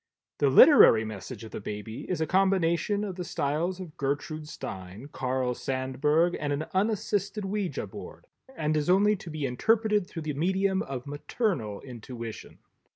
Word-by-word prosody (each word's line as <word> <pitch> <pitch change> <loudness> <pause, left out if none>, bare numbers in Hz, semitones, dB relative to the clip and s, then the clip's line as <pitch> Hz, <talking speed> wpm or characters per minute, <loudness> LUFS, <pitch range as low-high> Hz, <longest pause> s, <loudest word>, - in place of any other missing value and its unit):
The 140 - +4
Literary 130 - +8
Message 110 +1 -7
of 110 - -9
the - - -6
baby 105 +2 -6
is 180 -4 -1
a - - +2
combination 190 +1 +2
of 190 -3 -5
the 180 - -3
styles 165 +4 -1
of 175 -5 -8
Gertrude 145 +2 -3
Stein, 95 +1 -8
Carl 130 -1 -1
Sandberg 135 +7 0
and 145 - -2
an 145 +2 -1
unassisted 205 0 0
Ouija 195 -2 -2
board - - -10 0.3
and 155 0 0
is 150 +2 0
only 205 +3 +5
to 175 - -10
be 155 -2 -3
interpreted 210 - +2
through 165 -4 -7
the 150 -1 -2
medium 190 +5 +1
of 130 -2 -5
maternal 145 - -2
intuition. 115 -2 -8
155 Hz, 160 wpm, -28 LUFS, 130-190 Hz, 0.3 s, Literary